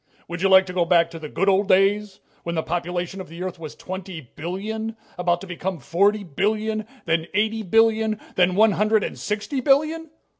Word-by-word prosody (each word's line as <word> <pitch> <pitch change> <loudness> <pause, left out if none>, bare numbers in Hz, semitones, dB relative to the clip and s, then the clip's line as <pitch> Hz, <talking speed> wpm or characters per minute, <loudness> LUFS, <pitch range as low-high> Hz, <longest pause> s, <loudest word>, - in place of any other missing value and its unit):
"Would 170 0 -6
you 195 - +3
like 190 0 +7
to 180 - -7
go 180 -1 +2
back 170 -1 +3
to 165 - -8
the 155 -1 -7
good 195 - -1
old 195 +1 +3
days, 195 +1 +2 0.2
when 170 0 -4
the 160 - 0
population 175 +2 -3
of 185 - -10
the 170 +2 -7
Earth 185 -2 -5
was 155 -2 -8
twenty 185 -2 -7 0.2
billion 220 +7 -4 0.2
about 175 -1 0
to - - -7
become 185 0 -4
forty 200 +10 +1
billion, 215 +6 -1 0.2
then 160 0 0
eighty 220 +1 +1
billion, 220 +1 +2
then 180 0 +2
one 220 +2 +5
hundred 215 +1 +2
and - - -5
sixty 215 +6 -3
billion? 310 +5 +2
190 Hz, 195 wpm, -23 LUFS, 175-215 Hz, 0.2 s, like